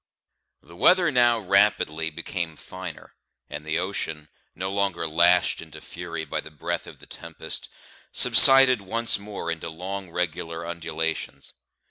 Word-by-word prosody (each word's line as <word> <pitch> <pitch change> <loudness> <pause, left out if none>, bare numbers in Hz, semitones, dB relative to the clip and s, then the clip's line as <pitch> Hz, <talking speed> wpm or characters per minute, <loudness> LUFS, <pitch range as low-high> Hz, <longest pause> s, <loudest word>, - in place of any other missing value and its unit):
The 85 +3 -16
weather 175 - +4
now 120 -2 +3
rapidly 95 -6 +1
became 80 +1 -5
finer, 95 0 -10 0.4
and - - -7
the 80 +1 -2
ocean, 80 -5 -5 0.3
no 95 +2 -4
longer 100 -4 -1
lashed 85 +3 +2
into 80 -2 -12
fury 85 0 -7
by - - -4
the - - -12
breath 75 -2 -5
of - - -12
the - - -15
tempest, - - -6 0.4
subsided 135 -3 +8
once 115 +4 0
more 100 -5 -6
into 80 0 -5
long 95 +3 -7
regular 85 -1 -4
undulations. 80 -1 -5
85 Hz, 135 wpm, -24 LUFS, 80-100 Hz, 0.4 s, subsided